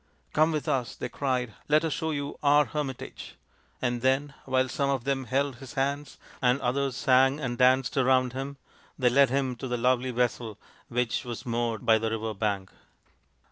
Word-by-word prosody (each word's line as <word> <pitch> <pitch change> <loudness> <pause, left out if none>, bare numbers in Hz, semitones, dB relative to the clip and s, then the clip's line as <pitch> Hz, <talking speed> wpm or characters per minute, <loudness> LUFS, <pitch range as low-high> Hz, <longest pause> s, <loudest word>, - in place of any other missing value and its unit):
" - - -38
Come 155 +2 +4
with 155 -2 -2
us," 125 -3 -1
they - - -5
cried. 125 -3 -1
" - - -32
Let 155 +2 +4
us 160 - 0
show 160 - -2
you 145 -2 -3
our 145 0 +5
hermit 145 -4 -4
age;" - - -10 0.5
and 120 -1 0
then, 135 +3 +1
while 130 0 +2
some 140 +2 -1
of 135 -3 0
them 135 -1 -1
held 135 +2 0
his 135 -1 -11
hands, 140 +1 -2 0.2
and 125 +1 +3
others 135 +1 0
sang 135 +2 +4
and 125 -4 -2
danced 130 0 +3
around 130 -1 +3
him, 135 +2 -5 0.4
they 125 -2 +3
led 135 0 +5
him 130 -1 0
to 130 - -5
the 125 0 -1
lovely 125 +1 +2
vessel 120 -3 -1 0.3
which 125 +2 -1
was 120 -3 -6
moored 115 -2 -2
by 110 -1 +5
the 115 0 -1
river 110 0 -3
bank. 100 -2 -2
130 Hz, 195 wpm, -28 LUFS, 120-140 Hz, 0.5 s, our